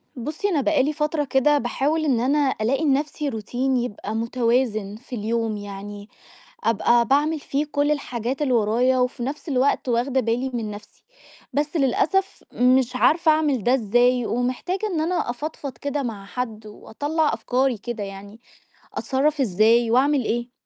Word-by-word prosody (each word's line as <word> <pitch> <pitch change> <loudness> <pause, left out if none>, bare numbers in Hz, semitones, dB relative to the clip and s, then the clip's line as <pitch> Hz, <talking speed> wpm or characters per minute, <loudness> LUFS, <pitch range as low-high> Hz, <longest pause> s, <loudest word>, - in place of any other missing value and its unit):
بُصّي، 305 - -3
أنا 310 -6 +1
بقى 255 +2 +2
لي 300 +3 0
فترة 300 0 -1
كده 280 +2 +3
باحاول 285 +6 0
إن 260 -5 +2
أنا 275 +2 +2
ألاقي 265 +8 +1
لنَفْسي 290 0 0
routine 220 +1 -8 0.3
يبقى 210 -2 -5
مُتوازِن 230 -3 0
في 245 +3 -9
اليوم، 225 0 -1
يعني 205 +1 -8 0.5
أبقى 235 +2 +3
باعمِل 300 +4 +2
فيه 285 +1 -2
كُلّ 290 0 0
الحاجات 255 -2 -3
اللي 275 -4 +1
ورايا، 240 +3 +2
وفي 250 0 -1
نَفْس 285 +5 -5
الوقت 265 -1 +1
واخْدة 245 +3 +1
بالي 240 +3 -1
من 225 -3 -3
نَفْسي، 205 0 -12 0.5
بس 295 +4 -1
للأسف 315 +8 +1
مش 255 0 +3
عارفة 320 +5 +4
أعمِل 300 -7 +1
ده 245 - +3
إزاي 245 +1 +2
ومحتاجة 255 - -2
إن 345 -6 -1
أنا 345 -4 -1
أفضفض 275 -1 -5
كده 285 0 -3
مع 215 -5 -5
حد 215 +1 -5
وأطلّع 290 +9 -2
أفكاري 255 -1 0
كده 230 0 -5
يعني، 200 +2 -9 0.5
أتصرّف 285 +2 0
إزاي 225 +2 +3
وأعمل 270 +2 +3
إيه؟ 240 +2 -2
255 Hz, 155 wpm, -23 LUFS, 230-290 Hz, 0.5 s, عارفة